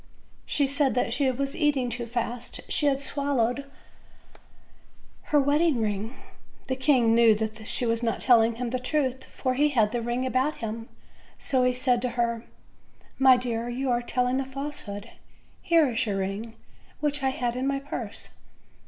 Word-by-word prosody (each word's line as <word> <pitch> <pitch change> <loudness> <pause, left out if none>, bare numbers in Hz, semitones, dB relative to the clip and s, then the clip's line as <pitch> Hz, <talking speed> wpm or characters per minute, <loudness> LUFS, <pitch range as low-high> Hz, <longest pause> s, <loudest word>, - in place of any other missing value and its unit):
She 285 - +2
said 275 -1 +1
that 245 +1 0
eat 275 +3 +1
ing 250 -2 -1
too 235 0 -4
fast 240 +1 -3
she 295 - +2
had 275 -1 +2
swallow 280 -4 0
3d 280 +2 -7 1.6
her 295 - +3
wedding 290 0 +2
ring. 215 +3 -2 0.5
The 260 - -1
king 260 -4 +3
knew 230 -1 +6
that 220 0 -4
she 245 - 0
was 230 0 0
not 230 -2 -1
telling 230 -2 +5
him 240 0 -3
the 255 - -1
truth, 260 -1 -1
for 255 -1 -2
he 295 +3 +3
had 225 -7 +2
the 240 0 -1
ring 240 +2 -1
about 260 +4 +1
him, 225 0 -6 0.5
so 260 -2 +1
he 250 - +4
said 250 -1 +1
to 250 - -1
her: 235 -1 0 0.7
"My 260 -1 +7
dear, 240 -1 -2
you 255 +2 -1
are 240 0 +1
telling 250 +1 0
a 270 - -2
falsehood; 265 -7 -6 0.5
here 330 -3 +4
is 235 +2 0
your 200 -2 -1
ring, 200 +4 -4 0.4
which 290 -1 0
I 265 - +2
had 245 -2 -2
in 255 +2 -1
my 275 0 +1
purse." 275 +1 -5
250 Hz, 170 wpm, -26 LUFS, 230-275 Hz, 1.6 s, My